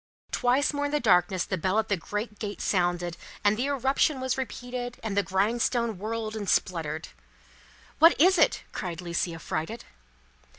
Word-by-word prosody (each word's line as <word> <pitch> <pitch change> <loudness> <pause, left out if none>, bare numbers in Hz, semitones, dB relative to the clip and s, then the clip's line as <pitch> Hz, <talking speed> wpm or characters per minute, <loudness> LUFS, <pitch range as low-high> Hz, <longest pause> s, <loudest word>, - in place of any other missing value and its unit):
Twice 255 +5 +2
more 290 0 -1
in 290 - -2
the 295 - +1
darkness 185 - +3
the 190 - -2
bell 190 +5 +1
at 220 - +1
the 200 - +2
great 210 +4 -5
gate 205 -2 -5
sounded, 175 -2 0 0.3
and 205 +1 +4
the 250 +5 -1
irruption 275 +1 +1
was 260 -1 -1
repeated, 245 -1 -5
and 215 -3 -2
the 200 - +4
grindstone 225 +2 0
whirled 220 +1 -3
and 205 -3 -3
spluttered. 160 -3 0 0.9
"What 330 +1 +7
is 365 +3 +5
it?" 315 - +3
cried 175 -4 -5
Lucie, 170 -1 -2
affrighted. 165 +7 -4
215 Hz, 165 wpm, -27 LUFS, 185-250 Hz, 0.9 s, What